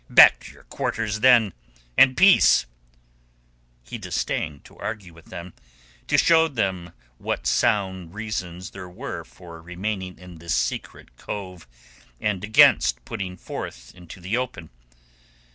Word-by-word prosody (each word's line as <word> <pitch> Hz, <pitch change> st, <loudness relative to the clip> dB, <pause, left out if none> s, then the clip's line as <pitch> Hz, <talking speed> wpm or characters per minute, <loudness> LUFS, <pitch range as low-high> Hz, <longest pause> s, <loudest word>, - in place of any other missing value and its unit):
Back -, -, +8 dB
to -, -, -10 dB
your -, -, -19 dB
quarters, 110 Hz, -2 st, -3 dB
then, 115 Hz, -4 st, +5 dB, 0.4 s
and 130 Hz, -1 st, +5 dB
peace!" 190 Hz, -, +6 dB, 1.2 s
He -, -, -8 dB
disdained 75 Hz, -2 st, -3 dB
to -, -, -16 dB
argue 105 Hz, -5 st, -6 dB
with 80 Hz, -1 st, -17 dB
them, 90 Hz, 0 st, -9 dB, 0.5 s
to -, -, +2 dB
show 165 Hz, -1 st, +5 dB
them 95 Hz, -, -3 dB, 0.3 s
what -, -, -3 dB
sound 95 Hz, -3 st, 0 dB
reasons 95 Hz, -5 st, -5 dB
there 95 Hz, -1 st, -9 dB
were 90 Hz, -, -6 dB
for 80 Hz, +6 st, -13 dB
remaining 90 Hz, +2 st, -5 dB
in 90 Hz, -2 st, -13 dB
this 85 Hz, -1 st, -2 dB
secret -, -, -4 dB
cove 90 Hz, -6 st, -7 dB, 0.5 s
and 105 Hz, -3 st, -2 dB
against 105 Hz, -, +4 dB
putting 95 Hz, -5 st, -5 dB
forth 60 Hz, -6 st, -8 dB
into 90 Hz, +1 st, -13 dB
the 95 Hz, +5 st, -2 dB
open. 125 Hz, -10 st, -5 dB
95 Hz, 130 wpm, -24 LUFS, 85-105 Hz, 1.2 s, Back